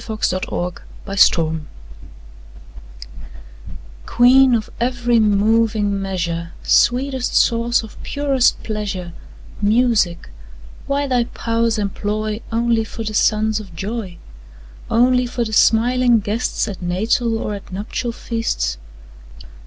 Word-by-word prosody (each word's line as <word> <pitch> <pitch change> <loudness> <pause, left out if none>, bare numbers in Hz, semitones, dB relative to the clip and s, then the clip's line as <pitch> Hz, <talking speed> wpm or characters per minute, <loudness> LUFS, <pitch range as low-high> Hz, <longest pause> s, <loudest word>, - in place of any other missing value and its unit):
Joseph 215 -4 -2
Warton 175 0 -4 0.2
Ode 195 0 -5
to 170 - 0
Music 155 -1 -4 2.4
QUEEN 255 +1 +5
of 215 -2 -3
every 240 -1 +1
moving 210 -1 +2
measure, 170 -3 -3
Sweetest 255 +1 +2
source 235 0 +2
of 220 - -12
purest 275 -3 +1
pleasure, 200 -5 -4 0.5
Music; 210 - +1 0.6
why 280 +1 0
thy 250 -3 +1
powers 230 -1 -1
employ 210 +1 -3
Only 230 0 +1
for 225 +1 -7
the 215 -1 -4
sons 215 0 +2
of 195 -5 -11
joy? 195 -1 -5 0.7
Only 250 +1 +3
for 240 0 -2
the 220 - -6
smiling 240 +2 +4
guests 215 +4 -2
At 195 -3 -7
natal 220 +6 0
or 210 - -4
at 200 -1 -9
nuptial 210 +5 -4
feasts? 65 - -3
220 Hz, 115 wpm, -19 LUFS, 200-240 Hz, 2.4 s, QUEEN